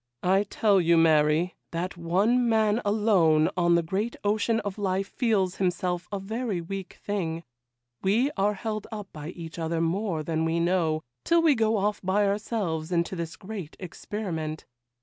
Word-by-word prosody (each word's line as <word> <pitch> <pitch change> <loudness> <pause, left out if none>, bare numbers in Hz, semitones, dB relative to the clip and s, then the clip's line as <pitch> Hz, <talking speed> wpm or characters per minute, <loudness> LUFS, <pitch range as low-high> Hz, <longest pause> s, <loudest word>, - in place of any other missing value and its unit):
I 195 +3 +3
tell 200 -1 +3
you, 170 0 +4
Mary, 160 +2 +4 0.2
that 175 +2 -3
one 200 +9 +2
man 220 0 +2
alone 190 -7 +3
on 175 -1 +3
the 170 - +2
great 200 +8 -2
ocean 215 +2 +1
of 205 0 -5
life 195 -1 0
feels 200 -7 0
himself 180 -1 -1
a 200 - -1
very 220 0 -3
weak 190 +2 -7
thing: 170 -5 -2 0.6
we 230 +9 +2
are 205 +1 +1
held 215 0 -4
up 210 -3 -6
by 150 0 -7
each 170 -1 -8
other 165 0 -1
more 165 0 -1
than 160 0 -1
we 165 +1 +1
know, 170 -3 +1 0.2
till 335 0 +3
we 315 -3 +6
go 225 -3 +2
off 205 +1 0
by 195 +2 +2
ourselves 195 -6 -2
into 170 +1 0
this 165 -2 -5
great 195 -6 -8
experiment. 170 -4 -5
190 Hz, 165 wpm, -27 LUFS, 170-210 Hz, 0.6 s, we